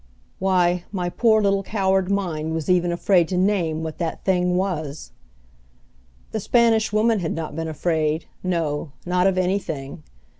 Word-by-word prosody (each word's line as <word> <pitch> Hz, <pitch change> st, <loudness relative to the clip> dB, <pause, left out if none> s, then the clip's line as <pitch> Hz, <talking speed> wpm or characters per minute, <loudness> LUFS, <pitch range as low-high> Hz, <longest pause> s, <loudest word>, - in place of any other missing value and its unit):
Why, 180 Hz, -2 st, +2 dB
my 180 Hz, -3 st, -2 dB
poor 220 Hz, +3 st, +3 dB
little 195 Hz, 0 st, +2 dB
coward 190 Hz, -2 st, 0 dB
mind 160 Hz, -5 st, -1 dB
was 160 Hz, +2 st, -1 dB
even 175 Hz, -1 st, +2 dB
afraid 175 Hz, 0 st, +3 dB
to 180 Hz, -, -2 dB
name 180 Hz, -5 st, +1 dB
what 160 Hz, -1 st, -6 dB
that 165 Hz, -2 st, -4 dB
thing 180 Hz, -1 st, +2 dB
was! 160 Hz, -6 st, -3 dB, 1.2 s
The 220 Hz, -, -2 dB
Spanish 225 Hz, 0 st, +3 dB
Woman 215 Hz, +1 st, +2 dB
had 165 Hz, -3 st, -2 dB
not 160 Hz, -2 st, -5 dB
been 165 Hz, 0 st, -3 dB
afraid, 155 Hz, 0 st, -1 dB, 0.2 s
no, 160 Hz, -5 st, -2 dB
not 180 Hz, +1 st, +2 dB
of 190 Hz, -1 st, +1 dB
anything! 180 Hz, -, -2 dB
180 Hz, 150 wpm, -23 LUFS, 160-195 Hz, 1.2 s, poor